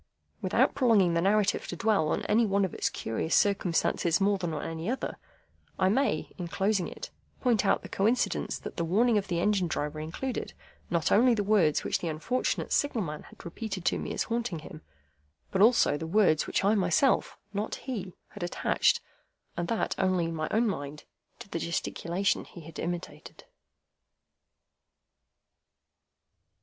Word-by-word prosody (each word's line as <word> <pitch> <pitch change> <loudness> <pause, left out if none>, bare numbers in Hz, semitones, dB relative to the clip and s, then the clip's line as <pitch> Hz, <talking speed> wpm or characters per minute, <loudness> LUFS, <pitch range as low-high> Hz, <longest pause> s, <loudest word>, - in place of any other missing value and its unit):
Without - - +2
prolonging 220 -10 +4
the 170 - +2
narrative 205 +2 +2
to - - -4
dwell 205 -3 +2
on - - -1
any 225 +3 +3
one 200 -2 +2
of 185 - -6
its - - 0
curious 115 +9 -2
circumstances 175 -3 +2
more 200 0 +2
than 175 -3 -2
on 155 - -4
any 165 +4 -4
other, 260 - -3 0.6
I 185 - +3
may, 265 +7 0
in 175 - -3
closing 195 +1 0
it, - - -8 0.3
point 240 -5 +2
out - - +2
the - - -7
coincidence 220 +6 0
that - - -9
the 170 - 0
warning 215 +6 +3
of 195 - -7
the 170 -2 -1
Engine 200 -1 +2
Driver 150 -1 -3
included, 165 +12 -4 0.4
not 170 -2 0
only 240 +3 +5
the 205 - 0
words 195 -7 +3
which - - 0
the 175 - -4
unfortunate 165 +11 -1
Signal 270 -7 +1
man 150 -3 -5
had - - -15
repeated 190 +1 -5
to - - +1
me - - -4
as - - -1
haunting 230 -6 -2
him, 155 - -10 0.7
but 190 - +1
also 220 -9 +5
the 160 - -5
words 175 -4 +3
which - - 0
I 205 - +4
myself—not 205 - 0
he—had 205 -4 -7
attached, 175 - +1 0.5
and 170 0 -2
that 225 - 0
only 185 -2 +2
in 165 - -3
my 155 -1 -2
own 230 +2 +2
mind, 145 -6 -4 0.3
to - - -11
the 165 - -3
gesticulation 170 +3 -1
he 175 - -12
had 160 0 -10
imitated. 175 0 -6
190 Hz, 165 wpm, -29 LUFS, 170-215 Hz, 0.7 s, only